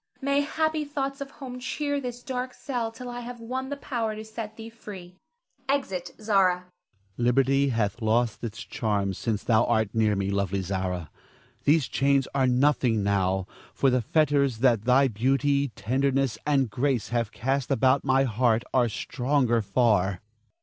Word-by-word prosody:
May 280 +1 +1
happy 315 +1 0
thoughts 275 -1 -4
of 275 - -5
home 255 -3 -8
cheer 285 +3 -2
this 245 -1 -6
dark 255 -2 -4
cell 240 -5 -3
till 250 +2 -9
I 245 0 -5
have 245 0 -8
won 260 +3 -4
the 285 - -4
power 230 -6 -3
to 215 +1 -7
set 220 -1 -7
thee 225 0 -9
free. 185 -5 -11 0.5
[Exit 195 -11 -1
Zara. 195 -4 +3
Ernest. 180 0 -10 0.5
Liberty 135 +3 +3
hath 115 -1 -1
lost 115 +1 +1
its 110 -1 -5
charms 105 -7 -2
since 110 -3 -2
thou 115 -1 +3
art 110 -3 +1
near 110 -2 +2
me, 100 0 -1
lovely 100 -1 -1
Zara. 90 -3 -3 0.5
These 145 -2 +4
chains 135 +3 +2
are 135 -2 +2
nothing 125 -4 +2
now, 95 -1 +1 0.3
for 135 - +3
the 125 0 +2
fetters 140 -1 +2
that 115 -4 +3
thy 130 +2 +5
beauty, 135 +5 +1
tenderness, 135 +3 0
and 135 -6 +2
grace 130 -2 0
have 115 -2 -1
cast 135 +1 -1
about 135 0 +3
my 135 0 +3
heart 120 -1 +2
are 125 -3 +3
stronger 125 +1 0
far. 100 -3 +2
135 Hz, 165 wpm, -26 LUFS, -, 0.5 s, thy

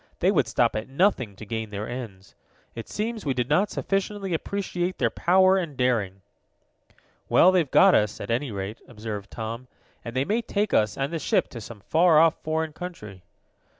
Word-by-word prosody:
They - - +2
would - - +2
stop - - +1
at 110 +3 -4
nothing 135 - +1
to 110 - -10
gain 110 0 -4
their 105 +1 -5
ends. 115 -6 -8 0.4
It 115 - -8
seems 220 +1 -3
we 135 -3 -1
did 125 -1 -1
not 185 +9 +2
sufficiently 195 -1 -2
appreciate 185 +1 -2
their - - +1
power 185 +1 +4
and 165 -7 -4
daring." 105 -7 0 1.1
"Well, 185 - +6
they've 175 -6 +2
got 190 +5 +6
us, 105 0 +2
at - - -5
any 125 +4 0
rate," 100 +2 -5
observed 105 -3 -7
Tom, 115 +3 -6 0.4
"and 120 +1 -7
they 130 +1 +1
may 225 +7 0
take 210 -2 -2
us 105 -1 +2
and 135 +4 -2
the 165 - -1
ship - - +1
to 120 - -8
some 105 -1 -10
far 165 - +4
off 160 +1 +4
foreign 160 0 -2
country." 105 - -8
135 Hz, 185 wpm, -25 LUFS, 110-180 Hz, 1.1 s, Well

